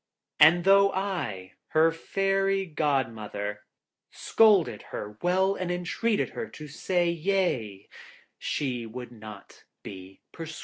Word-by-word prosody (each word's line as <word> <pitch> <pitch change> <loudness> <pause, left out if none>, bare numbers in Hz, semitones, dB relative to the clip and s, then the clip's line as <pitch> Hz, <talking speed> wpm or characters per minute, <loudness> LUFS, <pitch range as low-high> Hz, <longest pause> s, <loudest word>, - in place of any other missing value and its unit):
And 165 +3 +7
though 195 +1 +5
I, 155 - -3
her 160 +1 +3
Fairy 195 +3 0
Godmother, 115 - -2 0.4
scolded 200 - +3
her 105 +1 -7
well 190 +2 +2
and 185 -2 -4
entreated 180 +5 -1
her 225 - -6
to 155 -6 -10
say 175 +3 0
him 165 - -10
yea, 145 - -1 0.5
she 125 -5 -3
would 125 +2 -8
not 110 -3 -12 0.2
be 95 0 -10
persuaded. 165 -1 -8
160 Hz, 120 wpm, -27 LUFS, -, 0.5 s, And